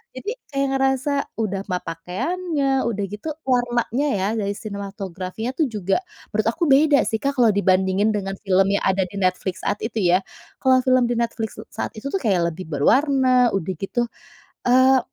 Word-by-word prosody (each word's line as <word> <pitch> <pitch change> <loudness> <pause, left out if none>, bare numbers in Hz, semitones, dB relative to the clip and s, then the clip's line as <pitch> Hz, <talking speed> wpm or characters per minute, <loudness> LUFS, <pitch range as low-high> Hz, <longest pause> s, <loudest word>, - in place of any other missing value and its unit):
jadi 415 - -4 0.2
kayak 275 -1 0
ngerasa 270 +1 +1 0.3
udah 200 -3 -1
mah 180 - +1
pakaiannya, 280 - -2 0.2
udah 205 -3 -2
gitu 210 +9 -7 0.2
warnanya 245 +1 +1
ya 190 - 0
dari 200 -1 -1
sinematografinya 200 +1 -5
tuh 310 - +3
juga 200 -4 -1 0.4
menurut 215 +1 +1
aku - - -3
beda 290 +1 +5
sih 220 - -1
Kak 280 0 0
kalau 235 -3 +5
dibandingin 190 +1 +2
dengan 195 -1 -3
film 190 0 +4
yang 200 - +1
ada 190 0 +2
di 185 - -12
Netflix 185 0 -1
saat - - 0
itu 225 0 -3
ya. 180 - +5 0.4
Kalau 260 -1 +4
film 255 -1 +4
di - - +1
Netflix 230 -2 -2
s - - -13
saat - - -3
itu 215 - -5
tuh - - +2
kayak 185 -7 +2
lebih 185 +3 -8
berwarna 265 - +3 0.3
udah 190 -1 -2
gitu, 195 +7 -3 0.7
eee, 260 +1 +6
215 Hz, 175 wpm, -22 LUFS, 190-260 Hz, 0.7 s, eee